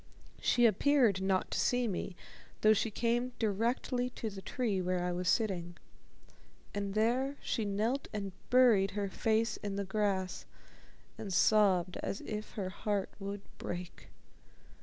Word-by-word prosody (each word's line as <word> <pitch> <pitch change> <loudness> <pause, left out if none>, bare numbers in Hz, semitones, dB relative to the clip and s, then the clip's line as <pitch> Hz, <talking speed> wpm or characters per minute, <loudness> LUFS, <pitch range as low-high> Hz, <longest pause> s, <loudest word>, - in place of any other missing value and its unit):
She 240 - +4
appeared 230 -2 +4
not 190 -1 0
to - - -1
see 245 -1 +2
me, 190 -2 -3 0.5
though 215 0 +6
she 220 +2 0
came 240 +3 0
directly 235 +4 0
to 225 -3 -5
the 195 -1 -8
tree 210 -4 -1
where 180 0 0
I 180 - 0
was 180 +1 -1
sitting. 175 -6 0 1.0
And 200 -1 -3
there 255 +6 +1
she 225 - -1
knelt 220 +7 -1
and 200 -2 -4 0.2
buried 235 -6 +5
her 200 -1 -1
face 220 +3 +1
in 200 -1 -4
the 200 0 -2
grass 195 -2 -1 0.7
and 200 - -5
sobbed 185 -2 +3
as 195 - -3
if 215 0 -5
her 195 -3 -3
heart 200 +1 -2
would 200 0 -5 0.2
break. 175 0 -6
205 Hz, 145 wpm, -33 LUFS, 190-230 Hz, 1.0 s, though